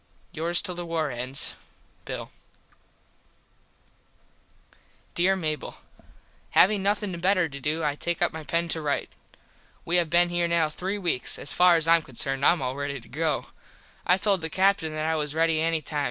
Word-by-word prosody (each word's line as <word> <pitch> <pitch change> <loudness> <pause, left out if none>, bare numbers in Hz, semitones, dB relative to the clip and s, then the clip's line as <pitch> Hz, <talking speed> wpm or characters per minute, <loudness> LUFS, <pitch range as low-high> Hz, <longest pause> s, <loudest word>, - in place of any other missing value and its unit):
Yours 170 +2 -1
till 180 - -2
the 175 0 -6
war 165 -3 -2
ends 125 +3 -2 0.5
Bill - - -6 2.8
Dere 185 +3 +2
Mable: 155 -5 -3 0.8
Having 200 +1 +5
nothin 200 -2 -1
better 180 -1 +2
to 140 -2 -9
do 155 +4 -1
I 145 -1 +1
take 170 +3 -3
up - - +2
my 160 0 -6
pen 170 +3 -1
to 160 - +2
rite. 145 -2 -2 0.7
We 175 +2 +2
have 170 -2 +1
been 175 +1 +3
here 175 0 0
now 170 -2 +2
three 190 +6 -4
weeks. 175 -10 -1
As - - 0
far 180 -1 +5
as 165 -1 +1
I 165 0 +7
am - - -4
concerned 135 0 -1
I - - +7
am 170 -5 -1
all 130 +1 -2
ready 140 -1 -4
to - - -17
go. 155 +3 -2 0.5
I 180 - +3
told 195 -2 +3
the 160 - -2
Captin 185 -2 +1
that 155 0 -2
I 160 0 +1
was 150 -1 -2
ready 165 -1 +2
any 165 -1 0
time. 150 +2 -2
165 Hz, 185 wpm, -26 LUFS, 150-175 Hz, 2.8 s, I